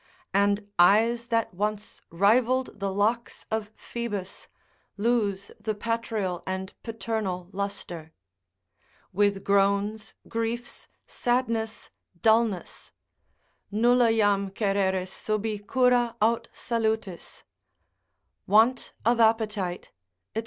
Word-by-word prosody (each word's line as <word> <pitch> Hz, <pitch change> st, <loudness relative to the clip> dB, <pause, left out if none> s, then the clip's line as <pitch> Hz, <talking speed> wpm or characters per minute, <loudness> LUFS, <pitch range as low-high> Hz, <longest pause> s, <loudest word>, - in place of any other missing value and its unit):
And 200 Hz, +1 st, +2 dB
eyes 230 Hz, +6 st, +4 dB
that 230 Hz, -5 st, 0 dB
once 210 Hz, +3 st, -3 dB
rivalled 235 Hz, +8 st, +2 dB
the 195 Hz, -1 st, -1 dB
locks 220 Hz, +5 st, -1 dB
of 220 Hz, -1 st, -2 dB
Phoebus, 205 Hz, -6 st, -5 dB, 0.5 s
lose 205 Hz, -3 st, 0 dB
the 215 Hz, 0 st, -2 dB
patrial 220 Hz, -4 st, -2 dB
and 190 Hz, 0 st, -4 dB
paternal 220 Hz, -6 st, -3 dB
lustre. 190 Hz, -5 st, -5 dB, 1.0 s
With 200 Hz, 0 st, +2 dB
groans, 200 Hz, +2 st, +1 dB
griefs, 230 Hz, +1 st, -4 dB, 0.2 s
sadness, 230 Hz, -3 st, -1 dB, 0.3 s
dullness, 220 Hz, -4 st, +1 dB, 0.8 s
———Nulla 240 Hz, +2 st, +4 dB
jam 205 Hz, -3 st, +2 dB
Cereris 190 Hz, -2 st, 0 dB
subi 215 Hz, 0 st, -2 dB
Cura 245 Hz, +2 st, +2 dB
aut 225 Hz, +2 st, +2 dB
salutis——— 220 Hz, -6 st, -3 dB, 1.0 s
want 225 Hz, +5 st, +3 dB
of 235 Hz, +1 st, +3 dB
appetite, 215 Hz, -5 st, +1 dB, 0.4 s
&c. -, -, +1 dB
215 Hz, 90 wpm, -27 LUFS, 200-230 Hz, 1.0 s, eyes